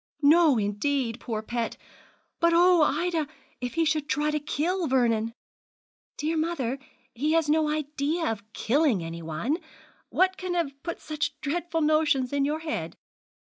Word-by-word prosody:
'No, 305 -2 +6
indeed, 230 +4 -1
poor 220 -3 -4
pet. 235 0 -3 0.6
But 335 0 +4
oh! 355 0 +6
Ida, 320 +1 +1 0.3
if 245 +2 -4
he 330 0 +2
should 310 -1 0
try 300 +1 +1
to 300 - 0
kill 325 +4 -1
Vernon!' 230 -4 +2 0.9
'Dear 315 +2 -1
mother, 280 -6 -1 0.3
he 295 +6 0
has 325 -2 +3
no 305 0 +3
idea 300 +2 -1
of 220 0 -7
killing 250 - +2
anyone. 165 - -3 0.5
What 375 0 +2
can 365 -1 -3
have 330 -5 0
put 340 - -5
such 300 -1 -3
dreadful 325 +2 -2
notions 300 -4 +2
in 280 -1 +2
your 305 +2 -1
head?' 315 -1 -4
300 Hz, 145 wpm, -27 LUFS, 250-325 Hz, 0.9 s, No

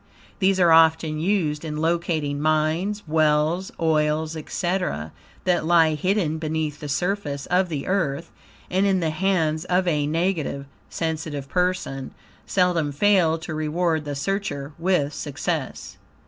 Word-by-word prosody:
These 190 -1 +3
are 175 -2 +5
often 160 -1 +4
used 160 -4 0
in 150 -2 -4
locating 160 -3 -1
mines, 155 +7 0
wells, 155 +3 +2
oils, 155 -1 +1
etc., 160 - -2 0.3
that 180 -3 +2
lie 165 -1 +4
hidden 165 0 0
beneath 155 -1 -2
the 150 - -6
surface 155 -3 -2
of 180 0 +3
the 150 -4 -3
earth, 165 -5 -1 0.4
and 190 +2 +2
in 190 -1 +2
the 165 -3 0
hands 160 -3 0
of 180 +1 +1
a 150 -4 +1
negative, 160 -4 -1 0.2
sensitive 155 -4 -3
person, 180 -7 -1 0.3
seldom 175 -5 +1
fail 170 0 +3
to 160 -1 -6
reward 155 +1 0
the 145 -1 -4
searcher 150 -2 -3
with 165 -5 +1
success. 145 0 -4
160 Hz, 135 wpm, -23 LUFS, 150-180 Hz, 0.4 s, are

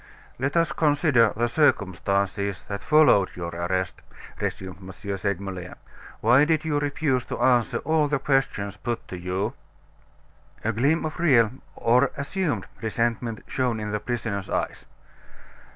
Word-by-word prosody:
"Let 135 +5 0
us 165 0 +3
consider 145 - +3
the 120 +1 +2
circumstances 100 - +1
that 100 0 -5
followed 150 -11 +5
your 85 -1 -4
arrest," 95 +1 -2 0.4
resumed 95 -2 -4
M. 95 - -10 0.3
Segmuller. 95 -2 -4 0.5
"Why 120 +6 +6
did 155 +1 +1
you 150 -2 +1
refuse 145 -3 0
to - - -5
answer 125 -3 +3
all 155 0 +3
the 150 0 +1
questions 130 -8 0
put 120 +2 -4
to - - -5
you?" 90 +2 -2 1.1
A 110 - +1
gleam 140 +9 +2
of 155 - -5
real 125 -10 +4 0.2
or 120 +2 +3
assumed 155 +3 -2 0.2
resentment 115 0 -1
shone 125 -4 -1
in 105 -1 -4
the 105 - -1
prisoner's 105 -3 -3
eyes. - - -2
115 Hz, 135 wpm, -25 LUFS, 100-145 Hz, 1.1 s, Why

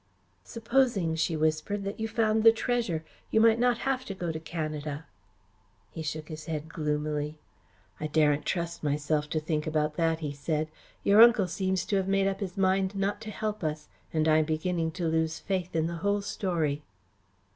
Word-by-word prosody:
"Supposing," 230 -7 +1
she 160 0 0
whispered, 155 +6 0
"that 200 +2 -5
you 220 - -1
found 220 -1 +2
the 225 - +9
treasure; 225 -9 -1 0.2
you 220 - +3
might 225 0 +5
not 245 -1 +3
have 265 -1 0
to 195 - -5
go 175 -3 -3
to 160 - -4
Canada." 155 -2 -4 0.9
He 160 - -6
shook 155 0 -4
his 155 -2 -8
head 155 -1 -4
gloomily. 150 -1 -2 0.6
"I 155 - -2
daren't 150 -1 +3
trust 170 -1 -2
myself 150 0 0
to 155 - 0
think 155 -1 -2
about 150 -1 0
that," 165 -1 +1
he 150 -2 -2
said. 155 +2 -2 0.3
"Your 205 +2 +6
uncle 235 -4 +7
seems 185 +1 -1
to 200 - +1
have 190 -1 0
made 195 0 +2
up 195 0 0
his 190 -3 -5
mind 190 0 +2
not 200 +2 -1
to 220 - -6
help 215 -1 -3
us, 155 -1 -3 0.2
and 155 0 +1
I'm 155 0 +4
beginning 165 +1 -1
to 175 -3 -2
lose 160 0 0
faith 185 -3 -3
in 160 -1 +2
the 170 0 -3
whole 200 +3 0
story." 165 -8 -1
165 Hz, 185 wpm, -28 LUFS, 155-200 Hz, 0.9 s, the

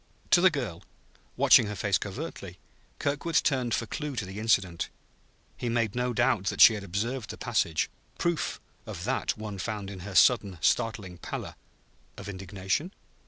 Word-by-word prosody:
To 175 - +7
the 185 - +7
girl, 120 - -4 0.6
watching - - +6
her 105 - -4
face 100 0 +1
covertly, 100 - -6 0.4
Kirkwood 145 +3 -2
turned 130 -7 +2
for 115 - -2
clue 150 +4 -4
to 110 - -2
the 95 +2 -7
incident. 95 -6 +1 0.7
He 120 - -3
made 115 -3 0
no 125 0 0
doubt 120 -4 +2
that - - -2
she 115 - +10
had 105 -2 -5
observed 110 +6 -3
the - - -6
passage; 80 -1 0 0.3
proof 170 -2 -1 0.3
of - - -6
that - - -1
one 105 -2 -6
found 100 0 -4
in 95 - -8
her 95 +1 -8
sudden 100 -7 +4
startling 95 -1 0
pallor - - -5 0.6
(of - - -8
indignation?) 95 - -3
110 Hz, 165 wpm, -28 LUFS, 95-125 Hz, 0.7 s, she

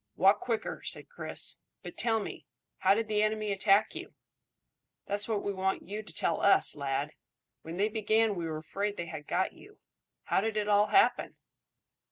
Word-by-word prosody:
"Walk 195 +2 +4
quicker," 230 -3 -3
said - - -3
Chris. 485 - 0 0.3
"But - - -8
tell 225 -2 +2
me, 210 - -7 0.3
how 190 +1 +4
did 225 0 -1
the 210 -1 +1
enemy 215 -1 0
attack 195 +1 +3
you?" - - -9 0.9
"That's 205 +1 -1
what 215 -3 -1
we 200 - -2
want 190 0 -2
you 210 +2 -4
to 180 - -9
tell 165 0 0
us, 200 - +5
lad. 140 +1 -2 0.5
When 165 +2 -8
they 205 +2 +2
began 220 0 +1
we 170 -3 -4
were 155 -1 -4
afraid 200 +6 -3
they 170 - -3
had 155 -3 -8
got 185 +1 0
you. 415 +1 -17 0.5
How - - +1
did 220 +1 -2
it 210 -1 0
all 205 0 +4
happen?" 390 - +3
205 Hz, 185 wpm, -30 LUFS, 185-215 Hz, 0.9 s, us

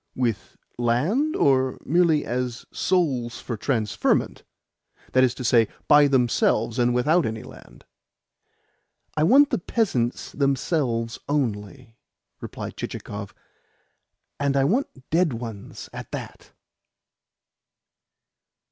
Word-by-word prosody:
"With 120 -5 -2 0.2
land, 160 - +1
or 130 -2 +2
merely 165 -1 +3
as 125 0 -3
souls 135 -10 0
for 120 - -5
transferment 110 -2 0 0.7
that 130 - +4
is 125 -2 +2
to 130 - -6
say, 115 -2 +4 0.2
by 145 0 +7
themselves, 120 -3 +1
and 120 0 +3
without 150 +8 +3
any 110 0 -4
land?" - - -15 1.3
"I 155 - 0
want 275 - +5
the 245 - +1
peasants 150 - -1
themselves 135 -4 -1
only," 115 -4 -3 0.4
replied - - -7
Chichikov. 100 -1 -6 1.0
"And 140 -1 +1
I 135 - +3
want 235 - +1 0.2
dead 165 -3 +2
ones 115 -3 -7
at - - -8
that." - - -8
130 Hz, 105 wpm, -24 LUFS, 115-155 Hz, 1.3 s, by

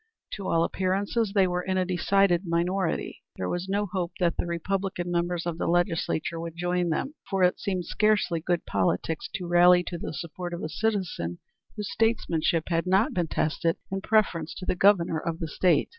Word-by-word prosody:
To 200 -2 -5
all 165 0 +3
appearances 195 +4 0
they 195 -2 +5
were 180 0 -1
in 185 +1 -1
a 185 - +2
decided 185 0 +2
minority. 175 +1 -1
There 90 - -3
was 175 - -3
no 205 +1 +1
hope 180 -2 -3
that 175 -2 +2
the - - -2
Republican 175 +1 -2
members 175 0 -1
of 170 -1 -3
the - - -1
Legislature 170 -2 0
would 165 0 -6
join 175 0 0
them, 220 - -1 0.2
for 195 -2 +1
it 180 - +3
seemed 185 -3 -2
scarcely 210 -4 +2
good 175 +1 -1
politics 100 - -1
to 180 - -4
rally 175 +1 +6
to 175 -1 -5
the - - -5
support 175 +3 -5
of 170 - -7
a 155 - -3
citizen 185 - -2 0.4
whose 210 -2 -4
statesmanship 175 -8 +1
had 170 +1 0
not 195 +9 +3
been 175 -6 0
tested 165 +2 0
in 195 0 -2
preference 190 -7 +1
to 185 - -7
the - - +1
Governor 180 -4 +3
of 165 -1 -3
the 165 -2 -4
State. 170 +1 +2
175 Hz, 190 wpm, -27 LUFS, 170-195 Hz, 0.4 s, rally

